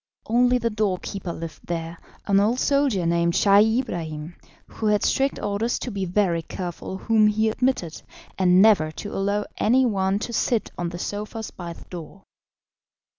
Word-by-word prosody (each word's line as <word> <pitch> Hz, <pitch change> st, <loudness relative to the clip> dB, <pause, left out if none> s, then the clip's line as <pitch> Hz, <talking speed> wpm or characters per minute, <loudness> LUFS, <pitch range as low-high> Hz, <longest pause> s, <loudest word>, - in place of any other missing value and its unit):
Only 245 Hz, +2 st, +3 dB
the 230 Hz, -1 st, -1 dB
door 210 Hz, -3 st, 0 dB
keeper 195 Hz, -1 st, -6 dB
lived 165 Hz, -1 st, -8 dB
there, 165 Hz, -1 st, -4 dB, 0.3 s
an 200 Hz, -1 st, +3 dB
old 225 Hz, +5 st, +2 dB
soldier 275 Hz, -12 st, +2 dB
named 170 Hz, 0 st, +2 dB
Scheih 210 Hz, +5 st, +5 dB
Ibrahim, 160 Hz, -7 st, -6 dB, 0.3 s
who 220 Hz, -, -4 dB
had 210 Hz, -1 st, +2 dB
strict 275 Hz, +1 st, +1 dB
orders 210 Hz, +3 st, -1 dB
to 250 Hz, -, -5 dB
be 195 Hz, -2 st, -2 dB
very 180 Hz, -2 st, +1 dB
careful 180 Hz, +2 st, -6 dB
whom 215 Hz, +1 st, +3 dB
he 220 Hz, +1 st, +2 dB
admitted, 220 Hz, -9 st, -1 dB, 0.3 s
and 185 Hz, 0 st, +5 dB
never 200 Hz, -8 st, +5 dB
to 205 Hz, -, -7 dB
allow 200 Hz, +1 st, 0 dB
any 255 Hz, +4 st, +3 dB
one 195 Hz, -3 st, +1 dB
to 235 Hz, +3 st, -5 dB
sit 230 Hz, -1 st, 0 dB
on 175 Hz, -1 st, -3 dB
the 175 Hz, -, -7 dB
sofas 210 Hz, +4 st, -5 dB
by 170 Hz, -2 st, -7 dB
the -, -, -14 dB
door. 180 Hz, +2 st, -10 dB
200 Hz, 170 wpm, -24 LUFS, 175-220 Hz, 0.3 s, Scheih